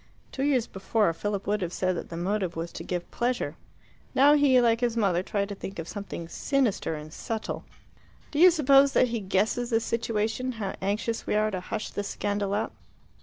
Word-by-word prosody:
Two 265 - -5
years 270 -4 +2
before, 195 -1 0
Philip 200 +3 -3
would 210 0 0
have 175 -2 -2
said 185 0 0
that - - -6
the 165 - -6
motive 185 0 -1
was 165 +1 -4
to - - -7
give 175 -1 -4
pleasure. 245 +1 -1 0.6
Now 280 +3 +7
he, 285 -3 +5
like 230 -1 +3
his 235 -1 0
mother, 190 -5 +2
tried 200 +1 -1
to - - -3
think 195 0 -7
of 165 -1 -5
something 200 -4 -6
sinister 240 - 0
and 155 +1 -9
subtle. 220 -1 -4 0.7
"Do 295 - -2
you 365 +2 +9
suppose 280 -4 +5
that 250 - +4
he 230 -1 -1
guesses 210 +5 0
the 225 -2 +3
situation 230 +2 -1
how 205 -4 -4
anxious 210 +4 -2
we - - +1
are 215 0 +2
to 185 - -2
hush 215 +4 -5
the - - -3
scandal 205 0 -2
up?" 215 - -2
210 Hz, 200 wpm, -27 LUFS, 190-240 Hz, 0.7 s, you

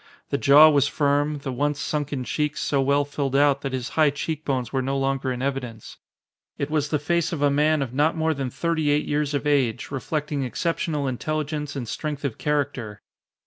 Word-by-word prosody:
The 140 - +1
jaw 145 +3 +8
was 145 -2 +4
firm, 145 +1 +1
the 135 - -3
once 145 +3 -1
sunken 145 -4 -2
cheeks 150 +3 -2
so 140 -2 +1
well 140 +1 +2
filled 140 -2 -3
out 140 0 +4
that 135 - -3
his 130 -1 -3
high 155 -2 +3
cheek 150 +2 -4
bones 130 -4 -2
were 135 - +1
no 135 +1 -1
longer 135 -1 -1
in 125 0 -4
evidence. 125 -5 -4 0.6
It 140 +1 -3
was 150 -2 0
the 150 - +1
face 165 +2 0
of 155 -4 -2
a 145 - +4
man 150 +1 +2
of 125 -2 -7
not 150 +5 +2
more 160 0 +1
than 135 -3 -3
thirty 160 +2 -1
eight 145 +1 +2
years 145 0 -1
of 140 - -2
age, 140 -6 +1
reflecting 145 +1 -2
exceptional 150 +2 -1
intelligence 150 +2 -3
and 125 -4 -4
strength 150 +3 -4
of 130 -6 -3
character. 135 -8 -2
145 Hz, 200 wpm, -24 LUFS, 135-150 Hz, 0.6 s, jaw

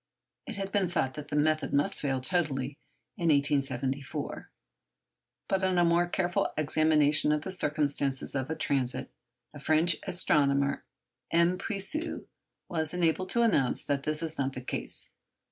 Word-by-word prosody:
It 235 - -5
had 195 -1 -4
been 195 -3 +1
thought 160 -7 -1
that 150 -1 -8
the 145 - -4
method 155 +1 +1
must 140 +1 +1
fail 135 -2 0
totally 140 -3 -1 0.4
in 170 -3 -1
1874. 140 -2 -1 1.0
But 190 0 0
on 185 -1 +2
a 175 - +4
more 170 +1 +3
careful 175 0 0
examination 155 -1 +3
of 150 0 0
the 190 - -4
circumstances 145 -5 0
of 135 -2 -2
the 160 - -3
transit, 135 -4 0 0.4
a 145 - -10
French 155 +4 +3
astronomer, 140 -5 +2 0.5
M. 170 +2 +3
Puiseux, 225 - -1 0.4
was 160 -1 -1
enabled 180 +1 +1
to 235 - +2
announce 145 - +2
that 140 -1 -1
this 155 +2 -2
is 160 -2 -4
not 135 -1 -1
the 125 - -6
case. 125 - -4
155 Hz, 150 wpm, -29 LUFS, 140-175 Hz, 1.0 s, a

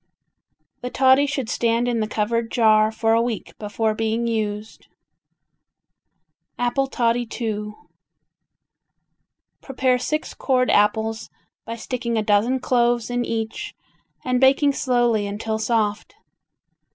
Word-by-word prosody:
The 250 - -4
toddy 265 +2 +4
should 270 -4 -3
stand 230 +1 0
in 240 -2 0
the 215 - -1
covered 225 +2 -1
jar 215 -2 +3
for 225 0 +1
a 230 - +3
week 235 -3 -4
before 215 +1 -1
being 225 +2 -1
used. 215 -2 -4 1.7
Apple 245 +3 0
Toddy 240 -1 0
II 210 -2 -3 1.9
Prepare 255 -2 0
six 305 +5 -3
cored 255 -2 +1
apples 220 +1 +1 0.4
by 230 - -5
sticking 235 0 -3
a 215 - +1
dozen 215 +5 +2
cloves 240 -2 +1
in 245 0 0
each 225 -1 -4 0.5
and 250 0 0
baking 275 +2 +4
slowly 240 -6 +1
until 220 +2 -3
soft. 220 - -1
230 Hz, 115 wpm, -22 LUFS, 220-250 Hz, 1.9 s, toddy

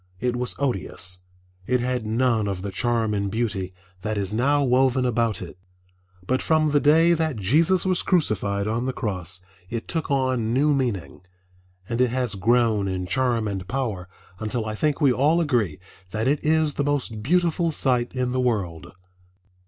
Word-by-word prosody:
It 125 -1 -1
was 125 0 -2
odious. 95 -8 -1 0.5
It 125 0 +2
had 125 -2 -2
none 115 -1 +1
of 95 -2 -3
the 100 - -4
charm 115 +2 0
and 100 -1 -1
beauty 105 -4 -2 0.3
that 110 +1 -2
is 100 0 -2
now 140 +5 +2
woven 130 0 +3
about 115 -5 0
it. 90 +1 -11 0.7
But 130 +6 0
from 155 -2 +2
the 145 - +4
day 160 +4 +5
that 160 -3 0
Jesus 155 - +2
was 185 -2 +1
crucified 105 - 0
on 115 +4 -1
the 130 - -1
cross 90 -6 -3 0.3
it 115 -1 -4
took 160 -2 -3
on 130 -4 0
new 145 +3 +3
meaning, 120 -13 -2 0.7
and 115 +1 -1
it 125 - +3
has 125 -2 -1
grown 110 0 +2
in 95 -1 -2
charm 115 +3 +1
and 95 -2 -4
power 105 -7 -3 0.3
until 110 +1 -2
I 110 - -3
think 150 +7 0
we 135 -4 +5
all 150 +7 +3
agree 120 - 0 0.3
that 110 +4 -2
it 145 +2 +1
is 155 -1 +2
the 145 - -1
most 140 -7 -2
beautiful 170 +4 +1
sight 125 -4 +1
in 125 -1 -1
the 130 0 0
world. 95 - -2
120 Hz, 175 wpm, -24 LUFS, 105-140 Hz, 0.7 s, day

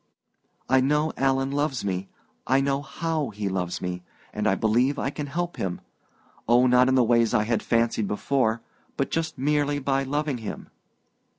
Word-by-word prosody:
I 130 0 +4
know 150 +4 +1
Alan 135 0 +1
loves 140 -5 -1
me 95 0 -3 0.4
I 135 +1 +4
know 135 0 0
how 155 +1 -2
he 105 -1 -4
loves 90 -2 -3
me 90 0 -3 0.3
and - - -1
I - - +3
believe 125 +6 +2
I 135 - -1
can 145 -1 -5
help 175 +4 -3
him 90 -2 -3 0.7
oh, 120 +2 +5
not 125 0 +5
in 130 - +3
the 130 - +5
ways 115 -1 +3
I 105 - +3
had 115 0 0
fancied 115 -2 +1
before 115 +1 0 0.3
but 135 - -1
just 165 -1 -2
merely 145 +1 +1
by 135 -1 0
loving 145 -1 -2
him." 110 - -7
130 Hz, 175 wpm, -25 LUFS, 115-145 Hz, 0.7 s, oh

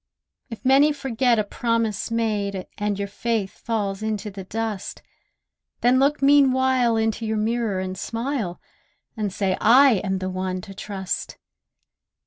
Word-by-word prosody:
If 230 +1 -9
many 275 +3 +5
forget 255 -3 +1
a 215 - +2
promise 230 0 -1
made, 205 -4 -1
And 205 -1 -1
your 200 0 -3
faith 210 -1 -3
falls 205 -4 -2
into 215 -1 -3
the 195 0 -8
dust, 220 -1 -4 0.8
Then 250 +2 +4
look 280 +1 +2
meanwhile 260 -4 +4
in 220 0 +1
your 220 -1 -2
mirror 220 -2 0
and 185 0 -4
smile, 230 -2 -3 0.6
And 210 -3 -2
say, 190 0 0
'I 250 -1 +6
am 190 -1 -1
one 185 0 -3
to 195 - -10
trust! 190 -1 -5
220 Hz, 135 wpm, -23 LUFS, 195-240 Hz, 0.8 s, I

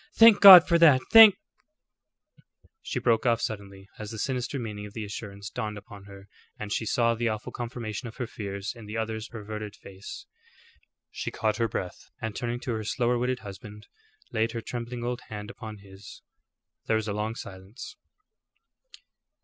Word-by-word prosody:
"Thank 225 -2 +8
God 185 -3 +11
for 170 -2 +3
that! 150 -6 +7
Thank 220 -3 +10 0.7
" - - -62 0.7
She - - -5
broke 115 -1 +1
off 115 -2 +3
suddenly 100 -3 -6
as 105 -1 -6
the 110 - -7
sinister 125 +3 -3
meaning 105 -4 -6
of 100 - -15
the 110 -2 -5
assurance 100 0 -8
dawned 110 -4 -4
upon 100 -1 -12
her 100 0 -13 0.3
and 105 -1 -5
she 110 - -2
saw 115 +1 +2
the 115 0 -1
awful 110 -1 -5
confirmation 120 -1 -6
of 115 - -10
her 125 - -3
fears 100 -2 -6
in 115 -3 -12
the 110 +2 -5
other's 110 0 -4
averted 105 -2 -7
face. 95 0 -11 0.9
She - - -5
caught 110 -1 -1
her 115 0 +1
breath, 90 -4 -6
and 110 -2 -5
turning 120 0 -3
to 125 - -4
her 110 -1 -4
slower 120 +2 0
witted 125 0 -2
husband, 105 +1 -11 0.5
laid 110 +1 -1
her 115 - -4
trembling 120 +1 -6
old 125 +1 -3
hand 105 +1 -7
upon 110 -3 -9
his. 100 0 -14 0.6
There 110 - +2
was 110 -1 -1
a 105 - -2
long 105 +2 -3
silence. 95 +5 -10
110 Hz, 175 wpm, -27 LUFS, 105-120 Hz, 0.9 s, God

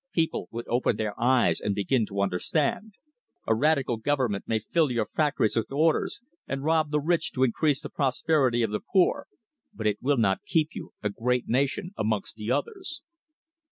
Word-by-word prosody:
People 165 -1 0
would 115 +1 -6
open 120 +2 +1
their 105 -2 -2
eyes 125 +1 +3
and 100 -1 -1
begin 110 +3 +1
to 100 -1 -3
understand. 150 - -1 0.5
A 110 - +3
Radical 140 -1 +2
Government 125 -4 -1
may 115 - +1
fill 150 +8 +1
your 120 -2 0
factories 145 -8 0
with 115 +2 -1
orders 155 +9 +1 0.3
and 135 0 -3
rob 160 0 +2
the 150 0 +1
rich 165 +3 0
to 130 - +1
increase 135 +3 +1
the - - -5
prosperity 135 -3 +1
of 110 - -1
the 105 - -1
poor, 190 -3 +1 0.4
but 110 - -7
it 105 -1 0
will 140 +2 +2
not 100 -4 +2
keep 155 -2 +1
you - - -8
a 105 - 0
great 125 +3 -1
nation 140 - 0
amongst 110 -2 -1
the 105 0 -6
others." 310 - -3
130 Hz, 180 wpm, -27 LUFS, 110-155 Hz, 0.5 s, eyes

